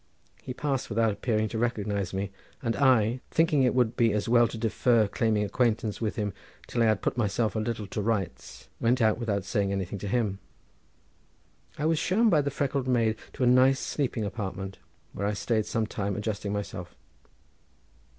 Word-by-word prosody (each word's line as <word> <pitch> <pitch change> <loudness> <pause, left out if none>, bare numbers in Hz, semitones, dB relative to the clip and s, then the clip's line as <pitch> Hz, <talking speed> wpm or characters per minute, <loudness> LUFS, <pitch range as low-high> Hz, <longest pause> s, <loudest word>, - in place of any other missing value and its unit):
He 125 - -6
passed 135 -3 -2
without 115 0 +2
appearing 110 +1 0
to 110 - -3
recognise 105 -5 -1
me, 95 0 -3 0.3
and 115 -2 0
I, 125 -3 +3
thinking 160 -3 +3
it 125 -1 +3
would 125 -3 +2
be 115 -3 +3
as 105 +1 -1
well 120 0 +5
to 115 - -7
defer 115 0 +2
claiming 110 +1 +1
acquaintance 110 0 0
with 110 -2 -1
him 105 -2 -2 0.3
till 120 - -2
I 115 - +5
had 110 -2 +1
put - - -1
myself 110 0 0
a - - +1
little 110 -1 -2
to 105 +2 -4
rights, 100 -4 -3
went 120 +2 +2
out 110 -1 +3
without 105 -5 -1
saying 100 +1 0
anything 95 0 -3
to 100 - -5
him. 105 -3 0 1.4
I 150 - -2
was 160 -1 +2
shown 220 +4 +3
by 150 - +5
the 140 - -1
freckled 140 -1 -1
maid 115 -3 +2 0.2
to - - -2
a - - +4
nice 130 +2 +5
sleeping 125 -6 -2
apartment, 95 -2 -5 0.3
where 100 - -2
I 105 - 0
stayed 110 +1 0
some 115 -1 0
time 100 -2 -3
adjusting 105 -1 -3
myself. 100 -4 -5
110 Hz, 185 wpm, -28 LUFS, 100-125 Hz, 1.4 s, well